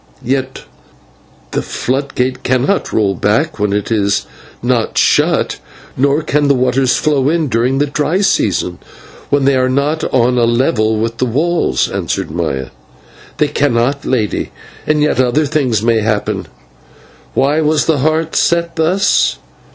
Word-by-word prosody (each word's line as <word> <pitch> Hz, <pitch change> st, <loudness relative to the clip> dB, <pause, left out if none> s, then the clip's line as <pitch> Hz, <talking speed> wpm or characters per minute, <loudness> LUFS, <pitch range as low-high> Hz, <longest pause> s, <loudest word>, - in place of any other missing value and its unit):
"Yet 130 Hz, +1 st, -2 dB, 0.9 s
the -, -, -1 dB
flood 135 Hz, +2 st, -3 dB
gate 125 Hz, 0 st, -1 dB
cannot 130 Hz, +10 st, 0 dB
roll 100 Hz, -3 st, +1 dB
back 125 Hz, -, 0 dB
when 105 Hz, -1 st, 0 dB
it 105 Hz, +2 st, -2 dB
is 100 Hz, -3 st, +1 dB, 0.4 s
not -, -, 0 dB
shut, -, -, +2 dB, 0.4 s
nor 140 Hz, +4 st, +1 dB
can 145 Hz, 0 st, +1 dB
the 140 Hz, -, +4 dB
waters 130 Hz, +1 st, +1 dB
flow 145 Hz, -3 st, +1 dB
in 160 Hz, -2 st, 0 dB
during 125 Hz, +3 st, +1 dB
the 145 Hz, -, +2 dB
dry 150 Hz, +6 st, -1 dB
season, 90 Hz, -, 0 dB, 0.5 s
when 140 Hz, -1 st, +2 dB
they 140 Hz, 0 st, +3 dB
are 130 Hz, 0 st, +2 dB
not 145 Hz, +4 st, 0 dB
on 125 Hz, 0 st, +2 dB
a 120 Hz, -, +3 dB
level 115 Hz, -2 st, +1 dB
with 115 Hz, +1 st, -2 dB
the 130 Hz, -, +1 dB
walls," 165 Hz, +9 st, 0 dB
answered -, -, -3 dB
Maya. 75 Hz, -6 st, -3 dB, 0.7 s
"They -, -, +1 dB
cannot, 120 Hz, +5 st, 0 dB
Lady, 110 Hz, -6 st, -1 dB, 0.4 s
and 150 Hz, -1 st, +2 dB
yet 150 Hz, -, +1 dB
other 130 Hz, +5 st, +1 dB
things 130 Hz, -8 st, 0 dB
may 115 Hz, -1 st, +2 dB
happen. 105 Hz, -1 st, -1 dB, 0.9 s
Why 145 Hz, +4 st, +2 dB
was 155 Hz, 0 st, +1 dB
the 160 Hz, -3 st, +1 dB
Heart 155 Hz, +3 st, 0 dB
set 170 Hz, 0 st, +1 dB
thus? 180 Hz, +5 st, +2 dB
130 Hz, 150 wpm, -15 LUFS, 115-150 Hz, 0.9 s, the